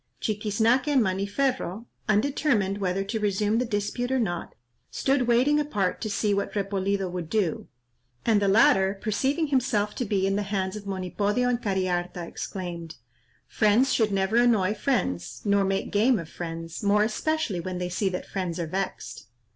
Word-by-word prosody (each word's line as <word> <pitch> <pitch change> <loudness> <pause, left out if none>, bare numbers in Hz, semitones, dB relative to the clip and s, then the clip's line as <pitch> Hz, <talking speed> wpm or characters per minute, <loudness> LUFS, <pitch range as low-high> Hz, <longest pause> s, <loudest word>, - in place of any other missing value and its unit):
Chiquiznaque 220 +4 +1
and 280 -5 +4
Maniferro, 200 +2 -1 0.2
undetermined 215 -3 +1
whether 195 0 0
to 220 +3 -3
resume 210 +2 +1
the 250 - 0
dispute 230 +3 -2
or 265 - +2
not, 175 -7 -3 0.3
stood 270 -2 +1
waiting 255 +5 +4
apart 210 -11 -1
to 215 - -2
see 205 0 +1
what 200 0 -1
Repolido 195 -1 -1
would 175 -2 -5
do, 200 -6 -1 0.6
and 220 -3 +3
the 200 - +2
latter 195 -1 +4
perceiving 275 +10 0
himself 245 -6 +1
to - - -2
be 195 -4 0
in 195 0 +1
the - - 0
hands 195 -1 -2
of 205 -1 -8
Monipodio 200 +5 -1
and 245 -1 0
Cariharta, 180 -3 -1
exclaimed, 170 -4 -6 0.5
"Friends 220 +5 +3
should 220 -3 +2
never 195 +3 +1
annoy 220 -5 +4
friends, 120 - -2
nor 200 -1 +3
make 195 0 -1
game 225 +4 +3
of 165 - -5
friends, 165 -1 -6
more 205 +1 +3
especially 235 - -1
when 180 +1 -4
they 180 0 -2
see 190 +2 0
that 180 - -4
friends 180 -3 -3
are 170 - -1
vexed." 190 +4 -4
205 Hz, 165 wpm, -26 LUFS, 190-230 Hz, 0.6 s, and